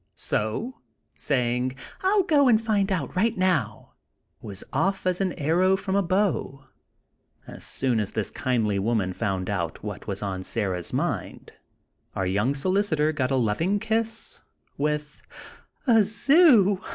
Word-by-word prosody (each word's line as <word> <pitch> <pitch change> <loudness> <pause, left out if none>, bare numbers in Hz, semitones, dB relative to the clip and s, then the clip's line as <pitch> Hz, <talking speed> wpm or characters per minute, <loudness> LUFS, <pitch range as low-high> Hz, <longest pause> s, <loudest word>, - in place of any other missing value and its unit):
So, 115 - -3 0.3
saying, 125 -1 -1 0.3
"I'll 390 +1 +3
go 295 -6 +4
and 225 -3 +5
find 210 -3 0
out, 165 -7 -2
right 225 +5 +1
now," 150 - 0 0.5
was 100 -2 -7
off 195 0 0
as 185 0 0
an 190 -2 +1
arrow 175 +6 +2
from 195 0 -3
a 200 - +3
bow. 185 -7 -1 0.8
As - - -11
soon 125 -4 -1
as 105 -1 -2
this 110 - -2
kindly 110 -6 0
woman 100 -3 0
found 95 -3 -2
out 85 -5 -3
what 105 -1 -7
was 100 0 -4
on 95 -2 -3
Sarah's 95 -4 -3
mind, - - -3 0.6
our 95 - -1
young 105 +9 0
solicitor 160 -1 +1
got 135 -5 -1
a 135 - +1
loving 130 - +1
kiss, 225 +1 -2 0.3
with: 150 +1 -2 0.6
"A 225 -5 +5
zoo! 215 - +4
150 Hz, 140 wpm, -25 LUFS, -, 0.8 s, and